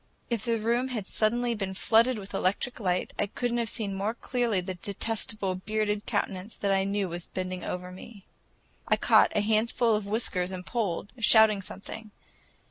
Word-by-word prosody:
If 230 -2 -1
the 230 -1 +1
room 235 +4 +1
had 230 -6 -3
suddenly 235 +4 +1
been 195 -3 -4
flooded 230 +4 +4
with 200 -1 -8
electric 200 +6 -1
light, 180 -4 -1
I 205 - +1
could 245 +4 -2
n't 240 - +1
have 230 -2 -1
seen 205 -3 -3
more 200 +4 -2
clearly 240 -4 0
the 185 +1 -4
detestable 200 +1 -2
bearded 210 +2 -2
countenance 200 -1 -2
that 200 - 0
I 195 0 +2
knew 200 0 0
was 175 +1 -6
bending 185 0 -4
over 180 0 -4
me. 195 +2 -12 0.6
I - - +4
caught - - +5
a 210 - +3
handful 225 +2 +2
of 210 -1 -1
whiskers 200 -4 0
and 185 -1 -6
pulled, 205 -4 -2
shouting 220 -2 +6
something. 210 +2 -8
210 Hz, 180 wpm, -28 LUFS, 190-230 Hz, 0.6 s, shouting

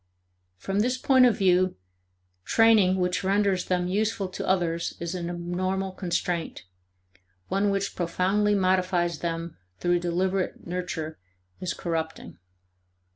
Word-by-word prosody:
From 195 - -2
this 250 +4 +1
point 260 -2 +5
of 230 - +1
view 185 -1 +3 0.7
training 220 - +4
which 180 +1 0
renders 195 -1 +1
them 180 -1 0
useful 205 +1 0
to 185 - -5
others 170 -3 0
is 170 +1 -4
an 175 -2 -4
abnormal 185 +2 -2
constraint; 175 -2 -2 0.9
one 200 +1 +1
which 195 0 -1
profoundly 190 +4 +1
modifies 185 -3 +1
them 165 -1 -4 0.2
through 175 0 +1
deliberate 185 +2 -1
nurture 175 -3 -4 0.4
is 185 - -3
corrupting. 160 - -4
185 Hz, 120 wpm, -26 LUFS, 175-195 Hz, 0.9 s, point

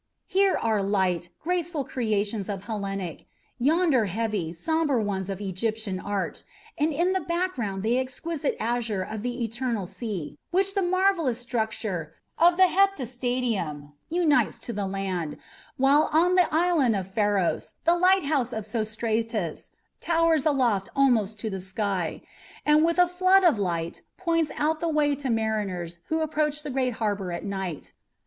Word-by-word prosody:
Here 390 0 +3
are 220 -3 +1
light, 190 -3 0
graceful 345 -3 -1
creations 215 -5 -1
of 195 -2 -4
Hellenic, 195 -6 -4 0.3
yonder 295 -3 +3
heavy, 205 -4 -2
sombre 295 - 0
ones 200 -3 -2
of 195 -1 -4
Egyptian 205 0 -3
art, 200 0 -3 0.3
and 305 +2 +1
in 345 +5 +1
the 380 - +1
background 335 - -2
the 235 +3 +2
exquisite 280 +4 -3
azure 225 -4 -1
of 215 +2 -6
the 245 +1 -3
eternal 230 -2 -2
sea, 180 -8 -6
which 385 +2 +1
the 395 - +1
marvellous 360 -8 +2
structure 220 -9 -3 0.2
of 345 +1 +5
the 375 - +7
heptastadium 245 - 0 0.2
unites 325 -3 +2
to 235 - -4
the 200 -2 -2
land; 190 -5 -3 0.4
while 275 +3 +4
on 340 +4 +4
the 360 -2 +4
island 315 -8 +3
of 190 -1 -4
Pharos 205 -4 +1
the 340 - +5
lighthouse 315 -8 +3
of 220 -2 -4
Sostratus 220 -4 -2 0.3
towers 330 -3 +2
aloft 240 -10 +2
almost 230 -6 +3
to 220 - -2
the 190 -1 -4
sky, 190 -2 -2 0.4
and 300 +1 +5
with 335 +1 +2
a 360 0 +6
flood 370 +2 +4
of 320 - +4
light 170 -3 -2 0.2
points 330 -4 +1
out 310 +1 +1
the 335 - -1
way 300 -2 +2
to 275 -2 -3
mariners 205 -7 -1
who 320 0 0
approach 300 -1 0
the 295 - -4
great 255 -1 0
harbour 205 -5 -2
at 170 - -5
night. 190 -6 -5
235 Hz, 150 wpm, -26 LUFS, 200-315 Hz, 0.4 s, the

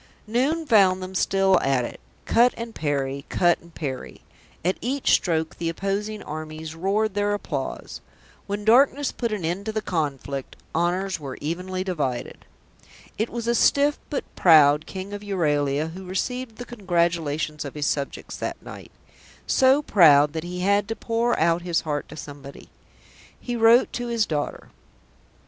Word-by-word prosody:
Noon 270 +9 0
found 190 -7 +4
them 185 +1 -7
still 190 0 +3
at 135 -3 +1
it; - - -8 0.3
cut 240 +2 +4
and 230 -1 -6
parry, 140 -4 -2
cut 175 -1 +3
and 170 - -17
parry; 135 -4 -6 0.4
at 185 - +1
each 270 +3 0
stroke 160 -2 +1
the 165 - -2
opposing 200 +5 -3
armies 155 +1 -7
roared 195 +5 0
their 205 0 +1
applause. 145 -9 -5 0.5
When 205 +1 -4
darkness 270 +5 +4
put 235 -2 -3
an 205 -6 -3
end 185 +6 -3
to - - 0
the 215 - -1
conflict, 140 -6 -3 0.2
honours 180 +3 0
were 135 -3 -7
evenly 180 +4 -3
divided. 145 -10 -3 0.7
It 220 - 0
was 235 0 -5
a 235 - +3
stiff 285 +4 +3
but 290 - -2
proud 150 -3 +6
King 190 +1 -7
of 205 - -5
Euralia 150 -6 0
who 185 +3 -9
received 235 +6 -3
the 245 - -8
congratulations 170 -8 -1
of 140 -1 -8
his 150 -1 -2
subjects 140 -1 -3
that - - -4
night; - - -10 0.5
so 265 +2 +4
proud 150 - +6
that 160 -1 -3
he 180 +1 -5
had 200 +1 +2
to 225 - -3
pour 230 +1 0
out 170 +1 +2
his 170 -1 0
heart 150 -2 -3
to 155 - -9
somebody. 140 -2 -10 0.7
He 245 - -4
wrote 230 +2 +5
to 245 0 -3
his 230 -2 +1
daughter. 150 -4 -4
185 Hz, 160 wpm, -24 LUFS, 155-220 Hz, 0.7 s, proud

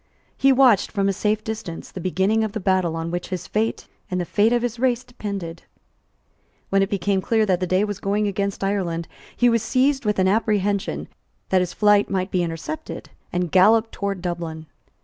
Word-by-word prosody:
He 275 - +4
watched, 255 -6 +5
from 195 -1 0
a 195 - +2
safe 210 +2 0
distance, 220 -7 -6
the 185 - -7
beginning 190 +5 +1
of 215 -2 -3
the 220 - -2
battle 185 -4 +1
on 165 0 -3
which 175 0 -3
his 185 -2 -4
fate 220 +2 -2 0.2
and 180 - -1
the 175 - -1
fate 210 +5 +2
of 240 0 +2
his 240 -1 -3
race 250 -1 +1
depended. 200 -9 -6 1.1
When 195 0 +3
it 195 - +1
became 195 -1 0
clear 220 +2 +2
that 185 -3 +1
the 185 - -1
day 185 +3 +2
was 205 -2 -3
going 205 +2 0
against 200 0 -2
Ireland, 180 -4 -1 0.3
he 245 - +4
was 230 -1 +3
seized 265 +4 +1
with 210 -1 0
an 185 0 +3
apprehension 205 -1 0 0.4
that 185 -1 +3
his 180 - -2
flight 205 -1 +4
might 190 0 -1
be 180 - +1
intercepted, 175 - -5 0.2
and 175 -2 -1
galloped 220 +4 +5
towards 200 -2 -3
Dublin. 170 -3 -4
200 Hz, 195 wpm, -23 LUFS, 185-220 Hz, 1.1 s, watched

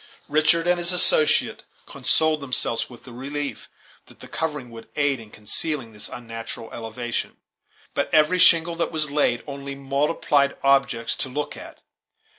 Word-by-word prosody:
Richard 155 +3 +3
and 175 0 +2
his 175 +1 +1
associate 460 - +3 0.2
consoled 155 -1 +1
themselves 125 -3 0
with 120 -2 -14
the 125 - -12
relief 140 0 -5 0.4
that - - -18
the - - -11
covering 150 -6 -4
would 115 0 -11
aid 145 -3 +1
in 110 -2 -12
concealing 115 +4 -3
this 105 0 -7
unnatural 115 -1 -8
elevation; 120 +1 -4 0.6
but - - -1
every 155 +4 +4
shingle 170 0 +6
that 170 - -1
was 155 -2 0
laid 140 -5 +1
only 140 -1 -6
multiplied 140 +1 +1
objects 135 -4 +2
to 130 - -3
look 145 +3 -4
at. - - -12
140 Hz, 150 wpm, -23 LUFS, 120-155 Hz, 0.6 s, shingle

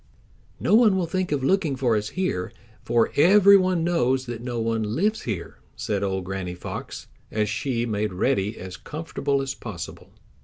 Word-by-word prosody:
"No - - +1
one 220 -3 +6
will 180 - 0
think 185 +1 -2
of 140 -3 0
looking 165 -2 +2
for 125 -3 +1
us 105 0 -1
here, 180 - -1 0.3
for 115 -1 +1
every 200 +6 +7
one 185 -3 +2
knows 130 -6 +1
that 120 -2 -6
no 120 -1 -3
one 115 0 0
lives 210 +6 +1
here," 95 -6 -5 0.2
said 100 -2 -2
old 95 -1 -1
Granny 90 -1 -4
Fox, 90 - -7 0.2
as 105 -1 0
she 115 +2 -1
made 105 -2 -1
Reddy 105 +2 0
as 95 0 -8
comfortable 145 -3 -2
as 135 0 -3
possible. 95 -8 -8
125 Hz, 170 wpm, -24 LUFS, 105-170 Hz, 0.3 s, every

